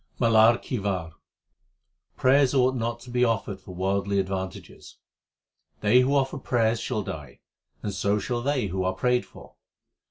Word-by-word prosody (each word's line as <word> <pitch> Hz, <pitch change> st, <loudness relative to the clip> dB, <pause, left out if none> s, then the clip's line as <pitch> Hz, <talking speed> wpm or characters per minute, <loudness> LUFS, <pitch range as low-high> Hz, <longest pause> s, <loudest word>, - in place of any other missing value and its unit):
MALAR 115 Hz, -1 st, +5 dB
KI 125 Hz, -, -4 dB
WAR 90 Hz, -5 st, -3 dB, 1.0 s
Prayers 135 Hz, +1 st, +4 dB
ought 130 Hz, 0 st, +3 dB
not 120 Hz, -1 st, -3 dB
to 125 Hz, -, -11 dB
be 125 Hz, 0 st, +2 dB
offered 110 Hz, -4 st, -1 dB
for 90 Hz, -2 st, -11 dB
worldly 100 Hz, +2 st, 0 dB
advan 95 Hz, -1 st, -3 dB
tages: -, -, -14 dB, 0.8 s
They 110 Hz, +4 st, +5 dB
who 130 Hz, +3 st, +2 dB
offer 135 Hz, +1 st, 0 dB
prayers 115 Hz, -3 st, +1 dB
shall 110 Hz, -4 st, -2 dB
die, 75 Hz, -8 st, -8 dB, 0.4 s
and 100 Hz, -, -3 dB
so 100 Hz, +2 st, 0 dB
shall 120 Hz, +3 st, -2 dB
they 135 Hz, -2 st, 0 dB
who 95 Hz, -1 st, -2 dB
are 95 Hz, 0 st, 0 dB
prayed 125 Hz, +5 st, +1 dB
for. -, -, -15 dB
115 Hz, 160 wpm, -26 LUFS, 95-125 Hz, 1.0 s, MALAR